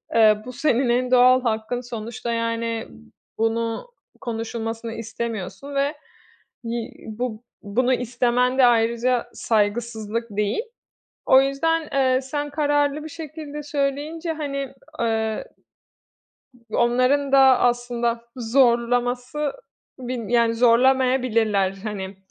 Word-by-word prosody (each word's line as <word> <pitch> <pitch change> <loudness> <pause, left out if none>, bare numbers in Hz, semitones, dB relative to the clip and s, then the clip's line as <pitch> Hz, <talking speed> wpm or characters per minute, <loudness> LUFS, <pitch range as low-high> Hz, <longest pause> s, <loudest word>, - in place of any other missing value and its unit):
Eee, 215 -2 +6
bu 250 - -7
senin 250 -1 +1
en 250 +1 +1
doğal 255 0 +6
hakkın. 230 +2 -1
Sonuçta, 235 0 -5
yani, 230 0 -2 0.5
bunu 225 - -1 0.3
konuşulmasını 225 -1 -4
istemiyorsun 230 +3 -5
ve 280 +2 +1 0.7
yi 235 +1 -4 0.2
bu 225 +1 -4 0.2
bunu 245 +6 +1
istemen 250 +1 +1
de 260 - +7
ayrıca 235 +1 +2
saygısızlık 220 +1 -1
değil. 205 - 0 0.6
O 260 0 +7
yüzden, 305 +4 0
eee, 260 -1 +3
sen 290 +2 -4
kararlı 290 0 +1
bir 315 - -7
şekilde 300 -1 -7
söyleyince, 295 +3 -2
hani, 275 -4 -4 0.3
eee, 220 -1 -1 1.3
onların 255 +5 +2
da 275 - +7 0.2
aslında 240 -1 0 0.2
zorlaması 245 +3 +1 0.5
bir 245 -3 -5
yani, 235 -1 +3
zorlamayabilirler. 235 -4 +3
Hani, 200 -3 -5
245 Hz, 100 wpm, -23 LUFS, 230-270 Hz, 1.3 s, de